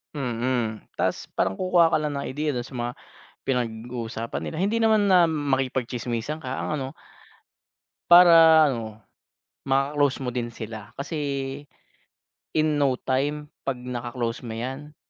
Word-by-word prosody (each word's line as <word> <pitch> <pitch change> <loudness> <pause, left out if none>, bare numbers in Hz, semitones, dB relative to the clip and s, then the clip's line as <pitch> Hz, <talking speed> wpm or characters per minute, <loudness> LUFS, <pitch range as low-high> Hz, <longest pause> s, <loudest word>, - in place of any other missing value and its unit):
Mm. 120 -4 -1 0.2
Ta's - - -1
parang 95 - 0
kukuha 175 -3 +4
ka 155 - +4
lang 150 -1 -2
ng 140 - -3
ideya 150 +1 -2
dun 120 - -2
sa 130 +1 -11
mga 120 0 -2 0.6
pinag-uusapan 115 -2 -3
nila, 160 - -5
hindi 205 +4 +1
naman 215 -2 +4
na 180 -2 +6
makipag-tsismisan 130 -2 -2
ka 130 - -5
ang - - -3
ano 135 -2 -3 1.2
para 165 -2 +8
ano, 110 -3 -6 0.7
ma-close 135 0 +1
mo 125 - -2
din 120 -1 -2
sila. 110 -2 -8
Kasi, 150 +4 -5 1.4
in 155 -1 +2
no 135 -3 +3
time 145 +3 -2 0.2
'pag 135 - +1
naka-close 120 -1 -4
mo 110 - -5
'yan, 135 +6 -6
130 Hz, 135 wpm, -25 LUFS, 120-150 Hz, 1.4 s, para